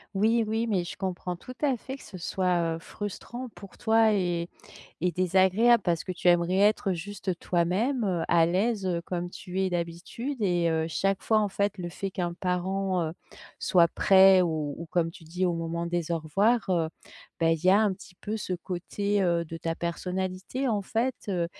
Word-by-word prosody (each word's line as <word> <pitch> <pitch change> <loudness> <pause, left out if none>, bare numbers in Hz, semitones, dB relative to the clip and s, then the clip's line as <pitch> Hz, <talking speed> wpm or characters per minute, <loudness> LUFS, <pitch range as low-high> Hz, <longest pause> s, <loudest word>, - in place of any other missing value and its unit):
Oui, 225 +3 +3
oui. 220 +2 0
Mais, 195 -6 0
je - - -6
comprends 180 -1 -3
tout 250 +8 -10
à 285 -4 +2
fait 265 +3 -7
que - - -15
ce 190 - -10
soit, 175 -2 0
heu, - - -7
frustrant 235 +7 -7
pour 200 -3 -13
toi 220 -1 +4
et 175 -4 0 0.5
et 180 +1 +1
désagréable 190 +6 +4
parce 170 -2 +1
que - - -7
tu 180 0 -4
aimerais 175 +1 +4
être 205 -1 +3
juste 185 0 -4
toi-même, 190 +11 0
heu, 180 -4 0
à 170 -1 +4
l'aise, 195 +4 0
heu, 175 -2 0
comme 175 0 -4
tu 180 +1 -5
es 190 -1 +1
d'habitude 175 +10 -4
et 175 -3 +2
heu, 160 -1 +1
chaque 195 +4 0
fois, 220 - +3
en 210 -1 +1
fait, 200 +1 -1
le 175 -1 -4
fait 195 +3 -5
qu'un 175 -2 -3
parent, 185 +1 -1
heu, 160 - -3 0.5
soit 175 -2 +5
prêt 190 +2 +6
ou 155 -4 -1
ou 170 - -7
comme 165 0 0
tu 170 - -14
dis, 180 +3 -1
au 175 - +1
moment 165 0 -3
des 170 -1 -2
au 170 - +1
revoir, 205 +9 +1
heu, 170 -3 +2 0.5
bah, 165 -1 +3
il 165 +1 -3
y 185 - +6
a 195 - +6
un 215 -2 +3
petit 180 -1 -15
peu 215 +3 -4
ce 200 -3 -4
côté, 195 +3 -2
heu, 170 -2 +1
de 165 0 -7
ta 165 0 -3
personnalité 185 +8 -3
en 210 -5 0
fait, 235 +6 0
heu, 175 -4 0
185 Hz, 205 wpm, -27 LUFS, 170-205 Hz, 0.5 s, prêt